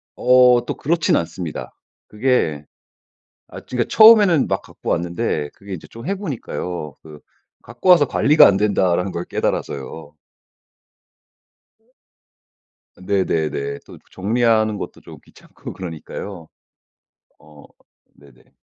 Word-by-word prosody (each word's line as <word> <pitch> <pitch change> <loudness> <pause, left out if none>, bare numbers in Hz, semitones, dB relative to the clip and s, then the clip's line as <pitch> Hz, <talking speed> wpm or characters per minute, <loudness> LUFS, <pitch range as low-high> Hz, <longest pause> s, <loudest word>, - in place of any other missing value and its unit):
어 125 -1 +4
또 - - -4
그렇진 165 +2 0
않습니다. 85 -1 -5 0.3
그게 105 - -1 0.8
아 - - -10
그러니까 125 -1 -3
처음에는 210 -8 +6
막 - - -1
갖고 - - -9
왔는데 85 -3 -2
그게 100 -1 -10
이제 85 - -9
좀 115 +8 -11
해 200 - -1
보니까요. 90 - -6
그 75 -2 -13 0.4
갖고 120 - -4
와서 170 -5 +7
'관리가 150 +3 +5
안 100 - +2
된다.'라는 95 -3 +1
걸 85 +1 -5
깨달아서요. 75 +2 -4 2.9
네네네. 80 -7 -2
또 - - -13
정리하는 110 +1 +1
것도 - - -8
좀 - - -13
귀찮고 - - -13
그러니까요. 85 0 -8 0.9
어 75 -1 -18 0.5
네네. 70 -3 -22
95 Hz, 250 characters per minute, -20 LUFS, 80-125 Hz, 2.9 s, 와서